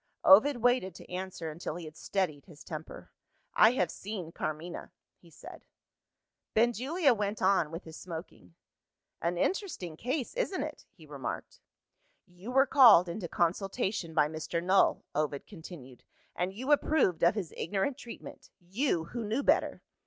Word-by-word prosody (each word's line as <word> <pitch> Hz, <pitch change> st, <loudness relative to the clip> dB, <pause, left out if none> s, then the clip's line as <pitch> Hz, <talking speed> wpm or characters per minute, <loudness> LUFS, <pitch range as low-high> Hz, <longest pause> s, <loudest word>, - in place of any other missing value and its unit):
Ovid 240 Hz, +9 st, +7 dB
waited 245 Hz, -8 st, +2 dB
to -, -, -13 dB
answer 180 Hz, -3 st, -5 dB
until 155 Hz, 0 st, -5 dB
he 175 Hz, -1 st, -7 dB
had 155 Hz, 0 st, -10 dB
steadied 175 Hz, -8 st, -2 dB
his 155 Hz, -5 st, -14 dB
temper. 160 Hz, -2 st, -8 dB, 0.4 s
"I 220 Hz, +3 st, +6 dB
have 180 Hz, -8 st, 0 dB
seen 190 Hz, -5 st, -6 dB
Carmina," 160 Hz, +2 st, -5 dB, 0.3 s
he -, -, -19 dB
said. -, -, -12 dB, 0.9 s
Benjulia 255 Hz, -, +3 dB
went 210 Hz, -1 st, -2 dB
on 185 Hz, -5 st, +3 dB
with 165 Hz, +3 st, -7 dB
his 160 Hz, -1 st, -10 dB
smoking. 160 Hz, -, -9 dB, 0.7 s
"An 170 Hz, +1 st, -1 dB
interesting 310 Hz, -, -2 dB
case, 255 Hz, -, -3 dB
isn't 445 Hz, -, -1 dB
it?" 305 Hz, 0 st, -8 dB
he 165 Hz, -5 st, -18 dB
remarked. 140 Hz, -4 st, -6 dB, 0.7 s
"You 180 Hz, +6 st, -11 dB
were 270 Hz, +2 st, +4 dB
called 240 Hz, -10 st, +7 dB
into 175 Hz, +1 st, -4 dB
consultation 180 Hz, 0 st, -1 dB
by 150 Hz, -2 st, +4 dB
Mr. 160 Hz, +2 st, -4 dB
Null," 190 Hz, +2 st, +3 dB
Ovid 150 Hz, -2 st, -2 dB
continued; 160 Hz, -, -12 dB, 0.3 s
"and 180 Hz, +1 st, -1 dB
you 255 Hz, +9 st, -4 dB
approved 290 Hz, -, +3 dB
of 170 Hz, +4 st, +5 dB
his 190 Hz, -7 st, -4 dB
ignorant 195 Hz, -, -1 dB
treatment 235 Hz, -, -10 dB
you, 185 Hz, -, -1 dB
who 230 Hz, +8 st, -6 dB
knew 225 Hz, +6 st, -1 dB
better." -, -, +1 dB
185 Hz, 150 wpm, -30 LUFS, 165-235 Hz, 0.9 s, Ovid